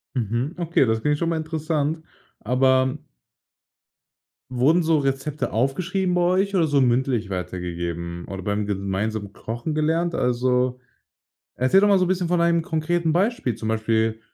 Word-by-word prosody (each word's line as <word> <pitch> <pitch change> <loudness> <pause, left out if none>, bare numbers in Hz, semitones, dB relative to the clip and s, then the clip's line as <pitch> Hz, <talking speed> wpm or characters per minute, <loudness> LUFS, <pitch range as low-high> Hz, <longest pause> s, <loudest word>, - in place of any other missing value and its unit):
Mhm, 120 - -2
okay, 170 -5 +2
das 110 0 0
klingt 150 +4 +1
schon 165 +2 -1
mal 165 - 0
interessant. 160 -1 -2 0.4
Aber 130 +3 +2 1.5
wurden 135 +8 +3
so 160 -2 +2
Rezepte 135 -1 -2
aufgeschrieben 180 - 0
bei 180 - +2
euch 190 +3 +1
oder 165 -3 +3
so 145 -1 +2
mündlich 125 -4 +1
weitergegeben 85 -2 -4
oder 95 -1 -5
beim 105 +1 -1
gemeinsamen 100 +1 -3
Kochen 120 +9 -5
gelernt? 165 +2 0
Also, 125 0 +1 0.8
erzähl 130 +10 +4
doch 205 - +4
mal 200 - +5
so 185 - +3
'n - - -2
bisschen 180 -2 0
von 175 -1 +2
einem 170 0 +3
konkreten 165 0 -1
Beispiel, 190 - 0
zum 110 +1 -5
Beispiel: 110 0 0
135 Hz, 150 wpm, -23 LUFS, 110-165 Hz, 1.5 s, mal